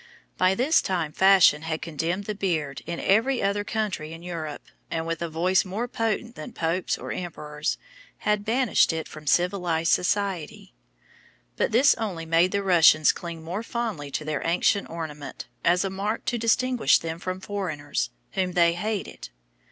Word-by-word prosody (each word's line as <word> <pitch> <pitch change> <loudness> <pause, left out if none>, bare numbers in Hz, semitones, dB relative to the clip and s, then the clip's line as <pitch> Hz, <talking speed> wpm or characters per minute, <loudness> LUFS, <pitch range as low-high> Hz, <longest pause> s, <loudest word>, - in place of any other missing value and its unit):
By 185 +1 +3
this 270 +9 +3
time 170 -5 -2
fashion 190 -4 +5
had 160 0 -3
condemned 165 +4 -2
the 210 - -3
beard 165 -8 -2
in 170 0 -4
every 235 +6 +2
other 200 +1 0
country 205 -8 -3
in 165 +1 -10
Europe, 160 -4 -5 0.3
and 165 0 -2
with 165 0 -3
a 170 - -2
voice 180 +4 +2
more 205 +6 -3
potent 230 0 -2
than 245 - -9
popes 170 +2 -1
or - - -6
emperors, 150 -4 -4 0.4
had 210 -1 0
banished 235 -1 +3
it 160 -1 -4
from 155 -1 -12
civilised 175 -1 +1
society. 195 0 -1 0.8
But - - 0
this 255 +5 +6
only 185 -7 -3
made 165 +3 +3
the 200 0 0
Russians 165 -4 +6
cling 170 -2 -8
more 180 +6 -4
fondly 225 -11 -4
to 150 +2 -4
their 155 -2 -2
ancient 180 +4 +1
ornament, 150 -4 -7 0.2
as 175 +2 +3
a 195 - -2
mark 205 +4 -3
to 240 - -1
distinguish 235 - +3
them 165 0 -5
from 185 +1 -4
foreigners, 175 -8 -3 0.2
whom 185 -2 -1
they 170 -1 +4
hated. 205 - -4
180 Hz, 165 wpm, -25 LUFS, 160-205 Hz, 0.8 s, this